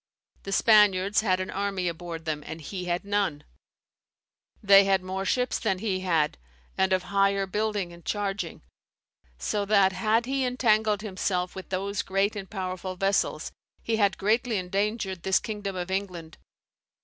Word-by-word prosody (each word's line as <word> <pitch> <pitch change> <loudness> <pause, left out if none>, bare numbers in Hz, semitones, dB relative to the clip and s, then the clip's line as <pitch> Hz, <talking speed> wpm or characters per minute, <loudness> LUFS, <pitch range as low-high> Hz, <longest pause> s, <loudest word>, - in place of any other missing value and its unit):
The 195 - -7
Spaniards 205 -2 +4
had 185 -4 +1
an 185 - -4
army 195 -2 -2
aboard 170 -1 -5
them, 150 -2 -3
and 160 - -6
he 180 +4 -6
had 175 +2 -2
none; 200 -7 -1 1.2
they 200 0 +8
had 195 -2 +2
more 190 +1 -3
ships 250 +4 0
than 205 -5 0
he 190 -2 -1
had, 165 - 0 0.4
and 190 0 +1
of 185 -1 +2
higher 195 +1 +2
building 205 -2 -2
and 170 0 -14
charging; 195 - -3 0.7
so 205 - -1
that, 200 -2 +4
had 215 +5 +1
he 270 +1 -1
entangled 220 -4 +2
himself 185 -3 -2
with 190 - -9
those 200 +2 -2
great 195 +2 0
and 195 -2 -6
powerful 185 -1 -4
vessels, 195 +2 0 0.3
he 225 -1 0
had 200 -3 +2
greatly 225 +3 +1
endangered 195 0 -2
this 190 +1 +3
kingdom 205 -3 -5
of 180 0 -4
England. 180 -4 -4
195 Hz, 155 wpm, -27 LUFS, 185-205 Hz, 1.2 s, they